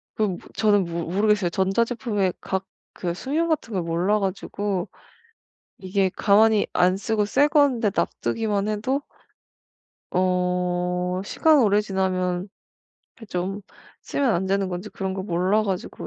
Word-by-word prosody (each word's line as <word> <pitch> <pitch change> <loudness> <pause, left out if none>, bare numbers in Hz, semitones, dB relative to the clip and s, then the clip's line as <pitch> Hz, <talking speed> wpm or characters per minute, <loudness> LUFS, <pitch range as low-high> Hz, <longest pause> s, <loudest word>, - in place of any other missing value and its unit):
그 215 - 0
뭐 185 -3 -3 0.2
저는 205 -3 +3
모 170 0 -4
모르겠어요. 205 -1 +2
전자제품의 205 +1 0
각 190 0 -3 0.3
그 175 -2 -3
수명 295 - -1
같은 300 -9 -1
걸 185 - 0
몰라 175 +5 +1
가지고 195 -1 -2 0.9
이게 190 0 0
가만히 215 +1 +4
안 185 +1 +3
쓰고 210 +1 0
새 275 +7 +3
건데 275 -7 +3
놔두기만 210 -2 -1
해도 255 +7 -1 1.1
어 180 0 0
시간 315 +8 +3
오래 210 -3 +4
지나면 185 -2 -1 0.7
그 225 - -12
좀 190 +2 -3 0.4
쓰면 270 -5 0
안 190 +1 0
되는 195 0 0
건지 180 +3 -5
그런 190 -2 -4
걸 190 0 -4
몰라 185 +4 +1
가지고 190 -3 -4
195 Hz, 260 characters per minute, -24 LUFS, 180-215 Hz, 1.1 s, 가만히